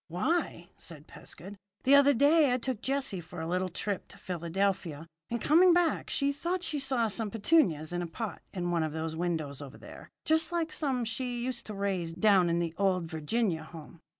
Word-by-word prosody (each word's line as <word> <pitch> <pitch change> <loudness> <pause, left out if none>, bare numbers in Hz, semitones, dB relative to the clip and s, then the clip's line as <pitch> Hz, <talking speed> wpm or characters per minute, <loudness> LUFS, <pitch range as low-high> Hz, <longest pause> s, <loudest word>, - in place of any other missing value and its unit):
"Why," 180 - -1
said 155 -4 -9
Pescud, 195 +4 -10 0.2
"the 270 - +4
other 280 0 +7
day 290 +2 +5
I 250 - +2
took 255 -2 -3
Jessie 270 -9 -2
for 165 +1 -10
a 160 - -3
little 185 +2 0
trip 195 +2 -3
to - - -13
Philadelphia, 170 -2 -2 0.2
and 235 - -2
coming 345 +8 +5
back 345 -3 +1
she 280 0 +1
thought 350 +5 -2
she 300 -4 -1
saw 260 -4 +1
some 220 0 -2
petunias 195 - +2
in 175 - -1
a 175 - -3
pot 195 +1 -5
in 175 -2 -2
one 170 -1 +1
of 155 -1 -2
those 160 0 -3
windows 160 -5 -2
over 140 -2 -9
there - - -12 0.2
just 320 +2 +2
like 330 -2 -1
some 260 -5 -1
she 245 +1 -2
used 250 -2 -4
to 210 - -6
raise 190 -4 -2
down 185 -1 +4
in 170 - +1
the 170 -2 -1
old 190 -3 +2
Virginia 160 +2 -1
home. 160 +1 -12
200 Hz, 200 wpm, -30 LUFS, 170-270 Hz, 0.2 s, other